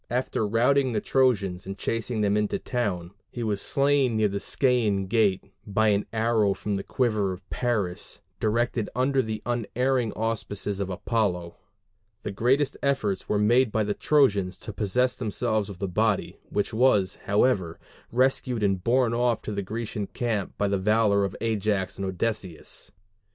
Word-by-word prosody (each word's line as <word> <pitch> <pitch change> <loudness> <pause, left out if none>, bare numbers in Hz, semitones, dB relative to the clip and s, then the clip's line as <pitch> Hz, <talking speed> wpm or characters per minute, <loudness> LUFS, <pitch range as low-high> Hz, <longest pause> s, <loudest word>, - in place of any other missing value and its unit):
After 120 -3 -1
routing 125 +4 +2
the 105 - +1
Trojans 100 -9 +1
and 95 0 -5
chasing 115 +1 -2
them 100 -1 +2
into 105 -1 0
the - - -5
town, 95 -9 -2 0.2
he 120 - -5
was 105 -3 -1
slain 140 -4 +2
near 110 -1 +3
the 100 0 -3
Scæan 110 -7 +1
gate 100 -2 +2 0.2
by 110 +2 +2
an 100 0 +1
arrow 110 -3 +2
from 105 - -3
the 100 - -1
quiver 110 -7 0
of 90 +1 -12
Paris, 105 -8 -2 0.2
directed 115 0 0
under 130 +2 +2
the 110 -3 -5
unerring 120 0 0
auspices 105 -3 -2
of 100 -1 -2
Apollo. 90 -3 -1 0.7
The 105 - -3
greatest 130 +8 +1
efforts 130 -9 -1
were 105 - +2
made 115 +3 +3
by 110 0 +1
the 105 0 -1
Trojans 100 -12 +2
to 110 - -8
possess 125 +5 +1
themselves 110 -2 -1
of 100 - -8
the 100 - -3
body, 105 +2 0
which 105 +2 -1
was, 110 -5 +3
however, 100 -5 +2 0.3
rescued 125 -2 +1
and 95 -3 +1
borne 120 +1 +2
off 120 -2 +1
to - - -4
the 100 -1 -2
Grecian 105 +1 -4
camp 110 -5 -3
by 100 - +1
the 100 -1 0
valor 105 0 +3
of 95 -1 -2
Ajax 105 -4 -1
and 100 - -3
Odysseus. 95 -2 -3
110 Hz, 165 wpm, -26 LUFS, 100-120 Hz, 0.7 s, near